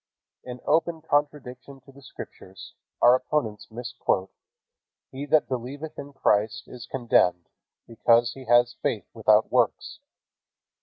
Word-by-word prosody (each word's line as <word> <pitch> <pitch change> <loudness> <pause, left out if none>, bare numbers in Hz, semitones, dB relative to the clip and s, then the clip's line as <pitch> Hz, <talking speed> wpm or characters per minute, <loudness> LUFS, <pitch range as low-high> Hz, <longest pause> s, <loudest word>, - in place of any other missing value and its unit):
In 125 0 -8
open 160 +1 +1
contradiction 140 -3 -2
to 135 +2 -18
the 140 +1 -17
Scriptures, 95 -6 -11 0.3
our 120 - +8
opponents 130 -5 -1
misquote, 115 -5 -2 0.8
"He 140 +2 -6
that 155 +1 +3
believeth 135 +5 -6
in 145 - -8
Christ 110 -4 +1
is 120 -2 -10
condemned, 90 -9 +1 0.4
because 115 +1 +2
he 135 -1 -11
has 120 0 +4
faith 105 - -1
without 110 -1 +3
works." 130 - 0
125 Hz, 120 wpm, -25 LUFS, 115-140 Hz, 0.8 s, our